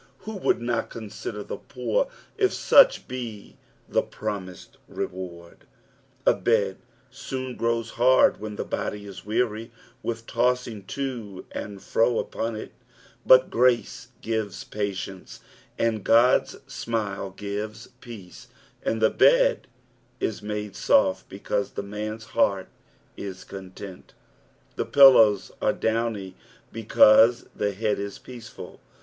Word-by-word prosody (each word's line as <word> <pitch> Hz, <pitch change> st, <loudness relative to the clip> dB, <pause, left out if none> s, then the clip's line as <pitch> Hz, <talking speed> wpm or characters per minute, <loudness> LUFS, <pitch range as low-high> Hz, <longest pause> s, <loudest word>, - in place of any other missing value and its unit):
Who 220 Hz, 0 st, -7 dB
would 185 Hz, -, +1 dB
not 120 Hz, -1 st, -2 dB
consider 105 Hz, -1 st, -7 dB
the -, -, -6 dB
poor -, -, -1 dB, 0.3 s
if 390 Hz, -2 st, +2 dB
such -, -, +5 dB
be 120 Hz, -5 st, -7 dB, 0.3 s
the -, -, +2 dB
promised 95 Hz, -3 st, -7 dB
reward 85 Hz, -2 st, -7 dB, 0.3 s
) -, -, -36 dB
A -, -, +6 dB
bed 105 Hz, -5 st, +1 dB, 0.3 s
soon 130 Hz, -1 st, -5 dB
grows 115 Hz, 0 st, -1 dB
hard 130 Hz, +2 st, +4 dB
when 105 Hz, 0 st, -6 dB
the -, -, -4 dB
body 105 Hz, 0 st, -4 dB
is 100 Hz, 0 st, -10 dB
weary 115 Hz, 0 st, -1 dB, 0.3 s
with 115 Hz, -1 st, -4 dB
tossing 120 Hz, -4 st, -1 dB
to 115 Hz, -7 st, -5 dB
and 100 Hz, -2 st, -7 dB
fro 115 Hz, +1 st, +2 dB
upon 115 Hz, 0 st, -3 dB
it, 110 Hz, -, -7 dB, 0.6 s
but 130 Hz, 0 st, +7 dB
grace 125 Hz, +2 st, +1 dB, 0.2 s
gives 110 Hz, -3 st, -3 dB
patience, 95 Hz, -2 st, -5 dB, 0.4 s
and 110 Hz, -3 st, 0 dB
Gud's 120 Hz, +5 st, +4 dB
smile 105 Hz, -4 st, -3 dB
^ives 105 Hz, +2 st, -5 dB
peace, 110 Hz, -8 st, -11 dB, 0.3 s
and 110 Hz, 0 st, -1 dB
the 110 Hz, -, +5 dB
bed -, -, +4 dB, 0.5 s
is 110 Hz, -, -2 dB
msde 105 Hz, -1 st, -4 dB
soft 95 Hz, 0 st, +2 dB
because 100 Hz, +1 st, -3 dB
the -, -, -4 dB
man's 105 Hz, +2 st, -5 dB
heart -, -, +1 dB, 0.5 s
is 95 Hz, -2 st, -7 dB
content; 95 Hz, 0 st, -10 dB, 0.6 s
the -, -, -1 dB
pillows 125 Hz, -7 st, +6 dB
are -, -, +2 dB
downy 110 Hz, -4 st, -2 dB, 0.4 s
because 115 Hz, +1 st, +5 dB
the 100 Hz, -1 st, -1 dB
head 105 Hz, +1 st, -1 dB
is 100 Hz, -1 st, -5 dB
peaceful. 120 Hz, -3 st, -11 dB
110 Hz, 125 wpm, -25 LUFS, 100-120 Hz, 0.6 s, but